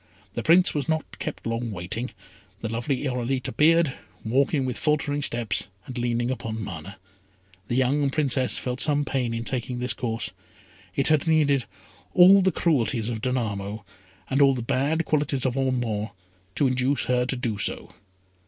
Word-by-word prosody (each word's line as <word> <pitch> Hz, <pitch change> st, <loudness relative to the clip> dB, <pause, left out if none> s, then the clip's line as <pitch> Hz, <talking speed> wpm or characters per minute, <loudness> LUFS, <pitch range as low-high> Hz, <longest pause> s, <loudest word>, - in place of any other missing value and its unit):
The 120 Hz, -, -3 dB
Prince 175 Hz, +7 st, +5 dB
was 145 Hz, -2 st, -2 dB
not 160 Hz, 0 st, -2 dB
kept 155 Hz, -, -5 dB
long 115 Hz, +1 st, -2 dB
waiting. 110 Hz, +6 st, -4 dB, 0.5 s
The 110 Hz, -, -3 dB
lovely 125 Hz, +5 st, -2 dB
Irolite 125 Hz, 0 st, -1 dB
appeared, 165 Hz, -1 st, +3 dB, 0.3 s
walking 135 Hz, +4 st, +2 dB
with 125 Hz, -2 st, -2 dB
faltering 145 Hz, 0 st, 0 dB
steps, 120 Hz, -6 st, 0 dB, 0.2 s
and 130 Hz, -, -8 dB
leaning 120 Hz, 0 st, 0 dB
upon 110 Hz, -3 st, -4 dB
Mana. 95 Hz, +1 st, -7 dB, 0.7 s
The 120 Hz, -, -1 dB
young 135 Hz, +2 st, +2 dB
Princess 135 Hz, -3 st, +1 dB
felt 125 Hz, 0 st, -2 dB
some 145 Hz, -1 st, +3 dB
pain 130 Hz, -4 st, -1 dB
in 115 Hz, 0 st, -3 dB
taking 125 Hz, +1 st, -3 dB
this 125 Hz, +1 st, -1 dB
course. 115 Hz, -2 st, -3 dB, 0.6 s
It 140 Hz, -, +3 dB
had 155 Hz, +1 st, +2 dB
needed 145 Hz, -5 st, +3 dB, 0.5 s
all 190 Hz, +2 st, +8 dB
the 190 Hz, 0 st, +3 dB
cruelties 125 Hz, -9 st, +1 dB
of 115 Hz, -2 st, -4 dB
Danamo, 110 Hz, -4 st, -2 dB, 0.4 s
and 135 Hz, +2 st, +1 dB
all 135 Hz, -1 st, +6 dB
the 120 Hz, -, -4 dB
bad 145 Hz, +7 st, 0 dB
qualities 145 Hz, -3 st, 0 dB
of 130 Hz, -1 st, 0 dB
Ormond, 120 Hz, -5 st, -1 dB, 0.5 s
to 145 Hz, -, +2 dB
induce 130 Hz, +2 st, +1 dB
her 125 Hz, 0 st, +1 dB
to 135 Hz, -, -1 dB
do 115 Hz, -5 st, -3 dB
so. -, -, -2 dB
130 Hz, 160 wpm, -25 LUFS, 115-145 Hz, 0.7 s, all